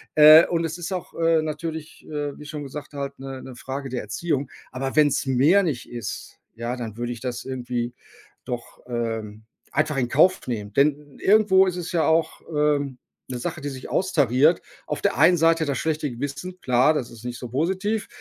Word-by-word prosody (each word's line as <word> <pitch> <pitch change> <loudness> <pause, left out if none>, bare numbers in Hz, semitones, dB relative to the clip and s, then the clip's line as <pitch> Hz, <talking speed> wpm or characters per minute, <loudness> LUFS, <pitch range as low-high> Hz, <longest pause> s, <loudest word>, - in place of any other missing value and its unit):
Äh, 155 +2 +9
und 170 -1 0
es 165 +1 -4
ist 175 +2 -4
auch, 180 - -5
äh, 165 -1 +4
natürlich, 155 0 -5
äh, 145 -2 -4
wie 150 - -10
schon 150 -1 -6
gesagt 145 +1 -8
halt 140 -1 -5
'ne 135 -1 -7
'ne 130 -2 -9
Frage 135 +2 -5
der 125 -1 -3
Erziehung. 135 +5 -2 0.2
Aber 135 +2 -4
wenn's 145 -2 +3
mehr 140 +10 +4
nicht 145 -9 -3
ist, 120 -3 -6 0.2
ja, 120 +2 -3
dann 115 -2 -6
würde 120 0 -3
ich 120 - -11
das 120 -2 -4
irgendwie 125 -2 -3 0.5
doch, 120 -1 -6
ähm, 115 -3 -4 0.3
einfach 150 -2 +1
in 120 -2 0
Kauf 185 +8 +4
nehmen, 105 -4 -4
denn 145 0 +1
irgendwo 195 -2 +5
ist 180 - -1
es 175 0 -5
ja 165 - +2
auch, 160 0 +1
ähm, 145 -3 +1 0.3
'ne 125 - -3
Sache, 155 +5 -4
die 145 - -3
sich 130 -1 -8
austariert. 150 -3 +3 0.3
Auf - - -3
der - - +1
einen 170 +3 +6
Seite 165 0 +3
das 140 -3 -1
schlechte 155 -2 -1
Gewissen, 145 +9 -5
klar, 125 +4 +4
das 120 -5 -3
ist 115 0 -12
nicht 120 -1 -5
so 125 - -6
positiv, 190 - -1
145 Hz, 195 wpm, -24 LUFS, 125-160 Hz, 0.5 s, Äh